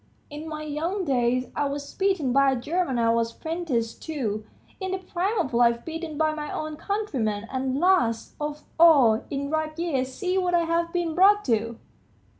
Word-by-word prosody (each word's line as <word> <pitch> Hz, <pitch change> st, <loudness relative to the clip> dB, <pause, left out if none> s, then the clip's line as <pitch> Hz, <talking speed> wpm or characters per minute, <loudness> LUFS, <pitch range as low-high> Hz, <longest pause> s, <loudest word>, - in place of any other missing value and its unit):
In 300 Hz, +2 st, -7 dB
my 305 Hz, -1 st, -5 dB
young 330 Hz, +6 st, -2 dB
days, 255 Hz, -2 st, +1 dB
I 290 Hz, -, 0 dB
was 285 Hz, 0 st, -4 dB
beaten 380 Hz, -10 st, +1 dB
by 275 Hz, 0 st, +5 dB
a -, -, +1 dB
German 285 Hz, +2 st, -1 dB
I 230 Hz, -1 st, +3 dB
was 230 Hz, 0 st, 0 dB
'prentice 315 Hz, -9 st, -2 dB
to; 230 Hz, -10 st, -3 dB, 0.4 s
in 380 Hz, -1 st, -3 dB
the -, -, 0 dB
prime 375 Hz, +3 st, -2 dB
of 265 Hz, -9 st, -1 dB
life 235 Hz, 0 st, +3 dB
beaten 325 Hz, -2 st, -5 dB
by 310 Hz, 0 st, +2 dB
my 300 Hz, -1 st, -5 dB
own 310 Hz, 0 st, -4 dB
countrymen, 265 Hz, -, -2 dB
and 260 Hz, 0 st, -1 dB
last 320 Hz, -12 st, +2 dB
of 295 Hz, 0 st, -4 dB, 0.2 s
all, 275 Hz, -10 st, +6 dB
in 280 Hz, 0 st, -3 dB
ripe 315 Hz, 0 st, -2 dB
years, 275 Hz, -7 st, -1 dB
see 370 Hz, +5 st, -1 dB
what 355 Hz, -1 st, +1 dB
I 340 Hz, -, +3 dB
have 335 Hz, 0 st, 0 dB
been 345 Hz, -2 st, -1 dB
brought 405 Hz, +4 st, +5 dB
to. 230 Hz, -1 st, 0 dB
300 Hz, 185 wpm, -25 LUFS, 250-345 Hz, 0.4 s, all